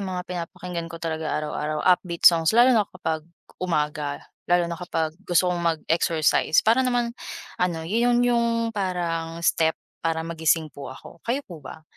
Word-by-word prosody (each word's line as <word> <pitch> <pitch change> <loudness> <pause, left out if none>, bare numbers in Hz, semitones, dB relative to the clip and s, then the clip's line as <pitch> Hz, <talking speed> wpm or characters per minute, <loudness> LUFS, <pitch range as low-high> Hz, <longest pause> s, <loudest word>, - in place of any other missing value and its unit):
mga 185 -2 -4
pinapakinggan 175 -1 -5
ko 165 - -8
talaga 160 -2 -3
araw-araw 150 0 -3
upbeat 180 -2 +2
songs, 165 +3 +6
lalo 245 +2 +7
na 215 -4 +2
kapag 160 -3 -3 0.4
umaga, 150 -4 -2 0.2
lalo 175 -1 +4
na 170 0 -5
kapag 165 -3 -2 0.2
gusto 180 +1 +3
kong 175 - -2
mag 165 -2 0
exercise, 160 -1 +2
para 230 +4 +4
naman 245 -2 0 0.5
ano, 170 -3 0
yun 240 +6 +2
yung 235 -1 +1
parang 170 -4 -2
step 160 -1 +2 0.2
para 165 0 -1
magising 160 -1 0
po 140 -1 -9
ako, 130 +5 -12
kayo 255 +5 0
po 175 - -11
ba? 150 +3 -11
170 Hz, 160 wpm, -24 LUFS, 160-190 Hz, 0.5 s, lalo